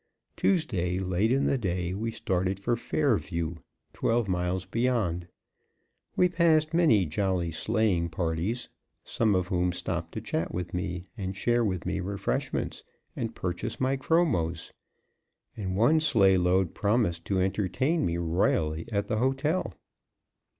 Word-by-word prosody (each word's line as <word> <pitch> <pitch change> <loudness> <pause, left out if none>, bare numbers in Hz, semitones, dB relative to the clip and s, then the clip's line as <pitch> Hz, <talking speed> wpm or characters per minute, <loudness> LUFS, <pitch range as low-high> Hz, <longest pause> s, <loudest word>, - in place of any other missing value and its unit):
Tuesday, 95 - +1
late 95 +4 +1
in 135 +2 +2
the 135 - +1
day, 90 -4 -1
we 110 +4 -2
started 95 -3 -1
for 120 +4 0
Fairview, 95 - -1 0.4
twelve 115 -2 +1
miles 90 0 -1
beyond. 100 -6 0 0.9
We 180 - +5
passed 165 -3 +3
many 140 - +4
jolly 90 +1 -1
sleighing 95 -1 +1
parties, 85 +8 -2 0.4
some 110 -4 +1
of 90 -1 0
whom 90 0 +1
stopped 90 - -4
to - - -3
chat 80 - -2
with 90 -1 -4
me, 90 0 -3
and 95 -3 -4
share 120 +2 +2
with 95 -5 -2
me - - -1
refreshments, 100 +1 -2 0.3
and 115 0 -4
purchase 90 -1 -3
my 130 +1 +1
chromos; 130 - 0 0.8
and 95 -3 -3
one 120 +11 +4
sleigh 100 -11 +4
load 90 0 +2
promised 100 -6 0
to 95 -2 0
entertain 110 - 0
me 85 0 0
royally 80 -2 0
at 100 -1 0
the 110 - -1
hotel. 135 +8 0
95 Hz, 135 wpm, -28 LUFS, 90-120 Hz, 0.9 s, We